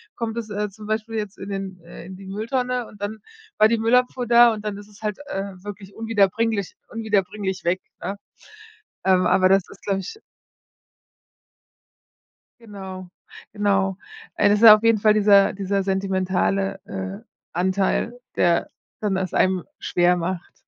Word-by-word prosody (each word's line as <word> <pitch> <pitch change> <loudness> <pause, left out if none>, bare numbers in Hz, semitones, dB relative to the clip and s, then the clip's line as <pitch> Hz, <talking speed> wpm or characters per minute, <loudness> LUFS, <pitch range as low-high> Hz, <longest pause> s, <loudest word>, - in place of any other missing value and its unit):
kommt 230 -1 -4
es, 220 -2 -4
äh, 210 0 -2
zum 210 +2 -12
Beispiel 220 +1 -2
jetzt 210 -2 -4
in 195 +1 -7
den 195 -2 -5
äh, 170 0 -11
in 190 +1 -9
die 195 +1 -12
Mülltonne 245 +5 -2
und 205 - -16
dann 210 +2 -4 0.4
war 215 - +6
die 230 +1 +1
Müllabfuhr 250 +2 +2
da 235 0 +7
und 215 -1 -7
dann 210 -1 -3
ist 205 0 -11
es 205 0 -18
halt, 210 -2 -2
äh, 195 0 -4
wirklich 200 -1 -9
unwiederbringlich 225 -1 0
unwiederbringlich 205 -3 -2
weg, 175 +2 0 0.2
ne? 200 - -4 0.9
Ähm, 185 -1 +4
aber 185 - +4
das 195 -1 +4
ist, - - -15
glaube 195 -1 -1
ich 195 - -9 2.4
Genau, 190 -4 -9 0.4
genau. 195 -2 +1 0.4
Es 205 - +4
ist 210 - +1
ja 215 -2 +12
auf 215 - -5
jeden 230 -2 +4
Fall 215 0 +5
dieser 200 -2 +5
dieser 195 0 -1
sentimentale, 195 0 0
äh, 195 -1 -6 0.3
Anteil, 190 +6 0 0.2
der 170 -1 +2 0.3
dann 205 -3 -1
das 190 -2 -2
einem 185 -1 +2 0.2
schwer 175 0 +2
macht. 175 +1 -4
200 Hz, 155 wpm, -23 LUFS, 190-215 Hz, 2.4 s, ja